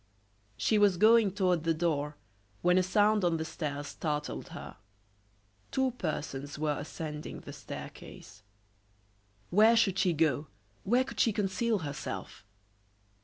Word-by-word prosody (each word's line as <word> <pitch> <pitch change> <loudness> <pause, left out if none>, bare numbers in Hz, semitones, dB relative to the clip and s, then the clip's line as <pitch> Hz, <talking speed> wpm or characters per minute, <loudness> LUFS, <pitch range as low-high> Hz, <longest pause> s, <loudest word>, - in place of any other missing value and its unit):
She 215 - +2
was 200 -3 +4
going 220 +1 +6
toward 180 -5 +1
the 165 -1 +1
door 150 -3 -1 0.5
when 180 +1 +5
a - - +4
sound 205 +2 +3
on 170 -2 +2
the 160 - -3
stairs 145 -3 -4
startled 150 -2 -3
her. - - -9 0.9
Two 265 -1 +1
persons 150 - -4
were 150 -1 -1
ascending 150 0 -6
the - - -9
staircase. 100 +1 -10 1.1
Where 220 +5 +6
should 195 -4 +3
she 180 -3 +3
go? 155 -2 +1 0.4
where 245 +5 +3
could 260 - -8
she 230 - +4
conceal 210 +3 0
herself? 145 -1 -6
175 Hz, 130 wpm, -30 LUFS, 150-210 Hz, 1.1 s, going